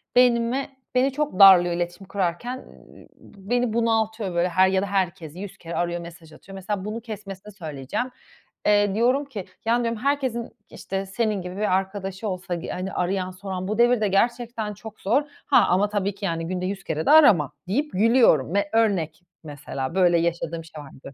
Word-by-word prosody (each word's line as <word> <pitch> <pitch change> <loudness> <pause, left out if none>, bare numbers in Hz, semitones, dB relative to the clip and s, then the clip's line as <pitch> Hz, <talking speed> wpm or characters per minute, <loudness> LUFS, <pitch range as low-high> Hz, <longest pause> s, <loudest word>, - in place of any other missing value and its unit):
beynime 245 +1 +3 0.3
beni 260 +2 +3
çok 290 -7 -3
darlıyor 180 -3 +8
iletişim 175 +2 -4
kurarken, 195 +6 -2
ııı, - - -16
b 195 0 -16
beni 245 -2 +1
bunaltıyor, 220 -4 0
böyle, 175 +1 +2
her 185 +2 +4
ya 190 0 +1
da - - -1
herkesi 180 -4 -2
100 200 -1 -8
kere 170 0 -7
arıyor, 175 0 -1
mesaj 170 -1 -12
atıyor. 195 - -13
Mesela, 190 0 -4
bunu 215 +2 -4
kesmesini 210 -3 -8
söyleyeceğim. 160 - -4 0.5
Eee, 205 -1 +3
diyorum 250 +6 +2
ki, 215 -9 -7 0.2
ya, 235 +2 +2
diyorum, 230 -1 -1
“Herkesin, 270 -2 0
ııı, 235 - -7 0.2
işte, 195 0 -5
senin 210 +1 -1
gibi 180 +1 -7
bir 210 -3 +1
arkadaşı 195 +1 -3
olsa, 185 -2 -3
g 170 - -6
hani, 185 +1 -4
arayan 185 +1 -1
soran 185 0 -5
bu 215 +1 -2
devirde 240 -2 +4
gerçekten 230 +1 0
çok 215 +1 -12
zor. 240 +9 +2 0.2
Ha, 245 -7 +5
ama 195 +3 +2
tabii 200 -1 -1
ki, 200 0 -6
yani, 165 -2 -2
günde 180 +1 -3
100 195 +1 -4
kere 160 0 -3
de - - +4
arama.” 210 - +6 0.2
deyip, 285 +11 -1
gülüyorum 215 - +4
m 200 - +2
ve 200 0 -2
örnek, 195 -9 +1 0.2
mesela, 145 -1 -6
böyle 175 -2 +4
yaşadığım 170 -1 -2
şey 160 -2 -11
vardı. 135 0 -13
195 Hz, 185 wpm, -24 LUFS, 175-225 Hz, 0.5 s, darlıyor